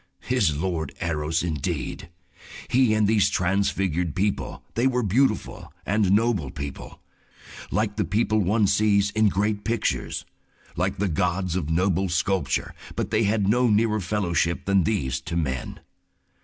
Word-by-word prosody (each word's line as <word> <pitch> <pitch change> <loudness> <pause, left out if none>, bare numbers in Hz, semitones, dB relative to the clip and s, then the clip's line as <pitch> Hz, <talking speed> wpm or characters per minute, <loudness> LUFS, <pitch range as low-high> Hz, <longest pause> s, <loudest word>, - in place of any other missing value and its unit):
His 100 - +1
Lord 80 -3 -3
Eros 80 0 -1
indeed! 80 -2 -3 0.6
He 125 -3 +3
and 105 -1 +3
these 105 -2 +3
transfigured 90 -3 0
people—they 105 +5 -1
were 125 -2 0
beautiful 125 +7 0
and 100 -1 +2
noble 105 - +1
people, 70 0 -7 0.7
like 105 -1 -1
the - - +2
people 110 +4 +1
one 105 +3 +2
sees 100 0 +3
in 110 -1 +3
great 105 +2 -1
pictures, 115 0 -2 0.5
like - - -1
the 100 - 0
gods 90 +1 -1
of 80 -5 -2
noble 95 +3 +1
sculpture, 85 -5 0 0.2
but - - -3
they 110 0 +2
had 100 -1 +1
no 125 +4 +3
nearer 110 0 +2
fellowship 85 -3 -1
than 100 -3 +3
these 70 -12 -1
to 85 - -5
men. 65 -6 -3
100 Hz, 140 wpm, -25 LUFS, 85-110 Hz, 0.7 s, He